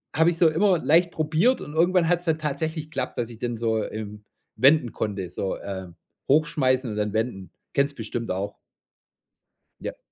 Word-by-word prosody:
habe 160 +2 +5
ich 170 - -2
so 165 -2 +5
immer 180 +2 +3
leicht 170 +3 +3
probiert 165 +11 +2
und 150 - -8
irgendwann 170 +1 +3
hat 175 0 +2
es 175 - -11
halt 160 -1 +1
tatsächlich 155 +2 -2
geklappt, 155 - -4
dass 120 -1 -2
ich 115 -2 -11
den 120 -1 -2
so, 110 -1 0
ähm, 105 -1 -7 0.3
wenden 135 -3 +4
konnte 100 -4 -3
so, 95 +2 -3
ähm, 95 -3 -7 0.3
hochschmeißen 135 -3 +2
und 105 - -5
dann 105 -1 -1
wenden. 110 -4 -2 0.2
Kennst 140 +1 +2
du - - -28
bestimmt 115 0 -4
auch. 100 +2 -3 1.2
Ja. - - -5
135 Hz, 185 wpm, -25 LUFS, 110-160 Hz, 1.2 s, habe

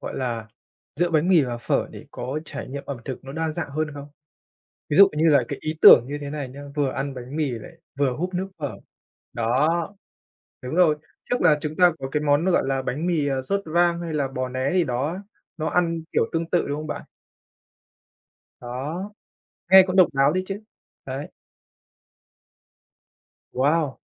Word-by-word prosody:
gọi - - -6
là, 115 -4 -3 0.5
giữa 175 +1 +1
bánh 160 +1 +2
mì 175 -5 +6
và 120 -3 -3
phở 120 - 0
để - - -11
có 130 +5 -4
trải 145 -2 -7
nghiệm 140 +1 -6
ẩm 140 - -4
thực 130 -1 -6
nó 135 - -8
đa 160 +1 -2
dạng 155 -1 -4
hơn 155 +2 -1
không? 145 0 -8 0.8
Ví 150 - +1
dụ 200 0 +9
như 160 +1 +4
là 145 -3 +6
cái 140 - -5
ý 155 - -2
tưởng - - +10
như 145 +2 -4
thế 145 - -5
này 145 -3 -5
nhá, 140 +3 -10
vừa 145 -2 +1
ăn 140 +1 -3
bánh 130 +2 -8
mì 155 -3 0
lại 115 -3 -7 0.3
vừa 135 -3 +2
húp 180 +5 -3
nước 185 +2 -2
phở. 145 -3 -4 0.6
Đó. 145 +9 +1 0.7
Đúng 125 +3 -5
rồi. 170 -4 +4 0.3
Trước 245 - +1
là 155 -4 +5
chúng 150 +1 -4
ta 180 -1 +6
có 135 - -5
cái 150 - 0
món 145 +2 +2
nó 190 - +2
gọi 175 - +3
là 135 0 0
bánh 145 +6 -3
mì, 165 -5 +1
ờ, 135 -2 -1
sốt 200 +9 -1
vang 170 +1 +2
hay 165 -2 -4
là 140 -3 0
bò 130 -1 -3
né 130 +2 -1
gì 180 - +3
đó, 140 +6 -2 0.4
nó 155 -1 -2
ăn 165 -2 0
kiểu - - +3
tương 165 0 -2
tự, 175 - +1
đúng 145 - -2
không 155 - -5
bạn? - - -5 1.6
Đó. 145 +11 -5 0.6
Nghe 190 0 +10
cũng 185 0 -2
độc 185 -2 +7
đáo 135 0 +4
đấy 185 - 0
chứ. 195 +1 -5 0.5
Đấy. 135 +2 -5 2.2
Wow! 145 +2 +1
150 Hz, 195 wpm, -24 LUFS, 135-170 Hz, 2.2 s, tưởng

